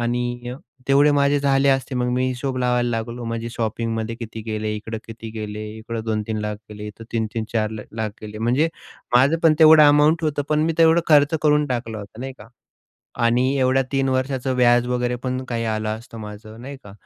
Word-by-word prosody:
आणि 120 Hz, 0 st, -2 dB
अ, 125 Hz, -, -6 dB, 0.3 s
तेवढे 145 Hz, +2 st, +5 dB
माझे 145 Hz, 0 st, +3 dB
झाले 140 Hz, 0 st, +3 dB
असते. 135 Hz, 0 st, +1 dB
मग 125 Hz, 0 st, 0 dB
मी 130 Hz, +1 st, +1 dB
हिशोब 130 Hz, +1 st, -3 dB
लावायला 125 Hz, -1 st, +1 dB
लागलो. 115 Hz, +1 st, -4 dB
माझी 115 Hz, 0 st, -3 dB
शॉपिंग 115 Hz, 0 st, -2 dB
मध्ये 110 Hz, +1 st, -3 dB
किती 115 Hz, -2 st, -7 dB
गेले, 110 Hz, -1 st, -2 dB
इकडं 110 Hz, +1 st, -6 dB
किती 115 Hz, 0 st, -9 dB
गेले, 110 Hz, -1 st, -6 dB
इकडं 115 Hz, 0 st, -5 dB
2,00,000-3,00,000 105 Hz, -1 st, -2 dB
गेले, 105 Hz, 0 st, -8 dB
इथं 105 Hz, +2 st, -10 dB
3-3-4 110 Hz, -1 st, -2 dB
ल 110 Hz, -, -6 dB, 0.2 s
लाख 110 Hz, -1 st, -2 dB
गेले. 105 Hz, 0 st, -7 dB
म्हणजे 125 Hz, +8 st, +2 dB, 0.5 s
माझं 140 Hz, +6 st, +4 dB
पण 160 Hz, -2 st, +5 dB
तेवढं 155 Hz, -1 st, +8 dB
अमाउंट 150 Hz, +3 st, +4 dB
होतं, 145 Hz, -1 st, 0 dB
पण 150 Hz, 0 st, +2 dB
मी 165 Hz, -, +1 dB
तेवढं 165 Hz, +1 st, +6 dB
खर्च 145 Hz, 0 st, +5 dB
करून 150 Hz, -1 st, +3 dB
टाकला 120 Hz, -4 st, -3 dB
होता 100 Hz, +3 st, -10 dB
नाही 135 Hz, 0 st, -5 dB
का 105 Hz, -, -12 dB, 0.8 s
आणि 125 Hz, +2 st, +2 dB
एवढ्या 130 Hz, 0 st, +3 dB
तीन 135 Hz, 0 st, +1 dB
वर्षाचं 130 Hz, 0 st, -1 dB
व्याज 120 Hz, -1 st, +4 dB
वगैरे 125 Hz, 0 st, -1 dB
पण 130 Hz, 0 st, -2 dB
काही 115 Hz, -1 st, -2 dB
आलं 110 Hz, -1 st, -2 dB
असतं 115 Hz, -1 st, -12 dB
माझं 110 Hz, +2 st, -10 dB
नाही 140 Hz, +1 st, -7 dB
का 100 Hz, -, -11 dB
120 Hz, 195 wpm, -22 LUFS, 110-135 Hz, 0.8 s, तेवढं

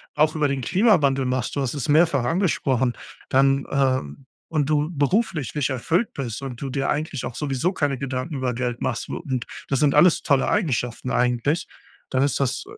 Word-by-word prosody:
auch 155 Hz, +1 st, +3 dB
über 150 Hz, -2 st, +2 dB
den 135 Hz, -1 st, -2 dB
Klimawandel 145 Hz, -, +3 dB
machst, 125 Hz, -1 st, -2 dB
du 140 Hz, -, 0 dB
hast 130 Hz, -3 st, -1 dB
es 140 Hz, -, -3 dB
mehrfach 150 Hz, -3 st, +4 dB
angesprochen, 135 Hz, -, +1 dB, 0.4 s
dann, 135 Hz, 0 st, +3 dB
ähm 130 Hz, -, 0 dB, 0.2 s
und 150 Hz, -3 st, 0 dB
du 150 Hz, -1 st, +2 dB
beruflich 155 Hz, -, 0 dB
nicht 145 Hz, -2 st, 0 dB
erfüllt 165 Hz, -, 0 dB
bist 130 Hz, -1 st, -5 dB
und 125 Hz, -4 st, -6 dB
du 135 Hz, -, -3 dB
dir 135 Hz, +1 st, -1 dB
eigentlich 150 Hz, -3 st, -2 dB
auch -, -, -5 dB
sowieso 140 Hz, +5 st, -1 dB
keine 145 Hz, -6 st, 0 dB
Gedanken 130 Hz, +3 st, -4 dB
über 130 Hz, -2 st, -1 dB
Geld 120 Hz, 0 st, -3 dB
machst, 120 Hz, -, -2 dB
wo -, -, -3 dB
und 130 Hz, -8 st, -3 dB, 0.2 s
das 135 Hz, -, 0 dB
sind 145 Hz, -2 st, +3 dB
alles 160 Hz, +3 st, +5 dB
tolle 140 Hz, -2 st, +2 dB
Eigenschaften 125 Hz, -, -1 dB
eigentlich, 125 Hz, +7 st, +1 dB, 0.5 s
dann 130 Hz, -, +1 dB
ist 140 Hz, +1 st, +1 dB
das 130 Hz, -2 st, -1 dB
140 Hz, 190 wpm, -23 LUFS, 130-150 Hz, 0.5 s, alles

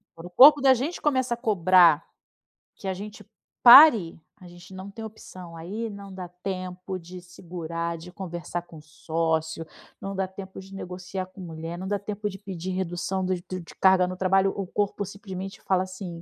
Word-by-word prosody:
Quando 165 Hz, +1 st, -10 dB
o -, -, -12 dB
corpo 285 Hz, +9 st, +8 dB
da 270 Hz, -1 st, +6 dB
gente, 275 Hz, +8 st, -3 dB
começa 260 Hz, -4 st, +1 dB
a -, -, -4 dB
cobrar, 185 Hz, -, +4 dB, 0.7 s
que 195 Hz, -, -9 dB
a 190 Hz, -, 0 dB
gente 205 Hz, +3 st, -9 dB, 0.4 s
pare, 240 Hz, -, +8 dB, 0.2 s
a 180 Hz, -, -12 dB
gente 175 Hz, +2 st, -14 dB
não 190 Hz, +1 st, -8 dB
tem 220 Hz, +2 st, -8 dB
opção. 185 Hz, -5 st, -11 dB
Aí 205 Hz, +8 st, -5 dB
não 200 Hz, -1 st, -10 dB
dá 185 Hz, -1 st, -7 dB
tempo 185 Hz, +1 st, -6 dB
de 180 Hz, +1 st, -11 dB
segurar, 170 Hz, -1 st, -6 dB
de 175 Hz, +2 st, -11 dB
conversar 175 Hz, -2 st, -6 dB
com 170 Hz, -2 st, -14 dB
o -, -, -12 dB
sócio, 160 Hz, +1 st, -2 dB, 0.4 s
não 195 Hz, 0 st, -5 dB
dá 190 Hz, 0 st, -1 dB
tempo 190 Hz, 0 st, -10 dB
de 190 Hz, +1 st, -12 dB
negociar 185 Hz, 0 st, -6 dB
com 185 Hz, +1 st, -14 dB
mulher, 165 Hz, 0 st, -7 dB
não 190 Hz, +2 st, -6 dB
dá 205 Hz, +1 st, -1 dB
tempo 210 Hz, +1 st, -4 dB
de 195 Hz, -1 st, -10 dB
pedir 190 Hz, -2 st, -6 dB
redução, 185 Hz, +1 st, -2 dB
do 185 Hz, 0 st, 0 dB
do 185 Hz, -, -5 dB
de 165 Hz, -, -14 dB
carga 190 Hz, -1 st, +5 dB
no 185 Hz, 0 st, -6 dB
trabalho. 195 Hz, +1 st, +2 dB
O 195 Hz, -, -3 dB
corpo 205 Hz, +2 st, -2 dB
simplesmente 195 Hz, -1 st, -8 dB
fala, 185 Hz, -1 st, +1 dB
assim: 185 Hz, -3 st, -8 dB
185 Hz, 190 wpm, -25 LUFS, 175-200 Hz, 0.7 s, corpo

